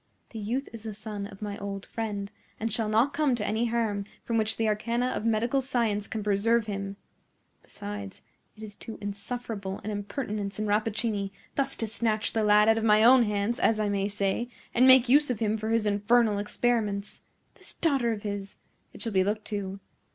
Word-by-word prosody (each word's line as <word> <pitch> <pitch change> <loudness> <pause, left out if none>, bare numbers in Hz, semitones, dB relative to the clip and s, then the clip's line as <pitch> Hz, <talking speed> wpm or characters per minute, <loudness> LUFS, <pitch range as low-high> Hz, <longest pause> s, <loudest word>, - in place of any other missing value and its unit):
"The 225 - -6
youth 240 +7 -2
is 230 - -8
the 220 -1 -6
son 210 -1 -5
of 200 +1 -11
my 205 -1 -4
old 200 -1 -5
friend, 205 -3 -4 0.3
and 225 -1 -2
shall 220 -1 -1
not 230 +6 +3
come 285 -3 +2
to 210 -3 -3
any 225 +3 0
harm 225 -4 -1 0.2
from 230 -1 0
which 220 0 0
the 225 - +1
arcana 235 +4 0
of 230 - -3
medical 235 +5 +2
science 230 -6 0
can 220 -2 -4
preserve 210 +3 +2
him. 195 -1 -4 0.6
Besides, 100 -1 -8 0.3
it 220 - -10
is 210 -1 -7
too 220 +2 -9
insufferable 205 -1 -5
an 215 - -3
impertinence 205 -1 -4
in 215 - -1
Rappaccini, 210 -1 0 0.2
thus 275 -1 0
to 225 - -1
snatch 220 0 0
the 225 - +1
lad 210 0 +5
out 225 0 +4
of - - -4
my 215 -1 +5
own 245 +1 +7
hands, 210 +2 -1
as 220 -1 +3
I 210 -1 +1
may 200 -1 0
say, 205 +3 -1 0.2
and 250 +2 +5
make 260 -1 +8
use 290 +3 +5
of 250 - 0
him 215 -1 +1
for 220 0 -3
his 225 -1 +2
infernal 210 +1 +3
experiments. 210 -1 -1 0.3
This - - -12
daughter 275 -8 +1
of 210 -2 -4
his! 200 -2 -5 0.4
It - - -5
shall 225 -3 -3
be 190 -1 +4
looked 210 +2 -2
to. 200 -2 -4
215 Hz, 200 wpm, -28 LUFS, 205-235 Hz, 0.6 s, make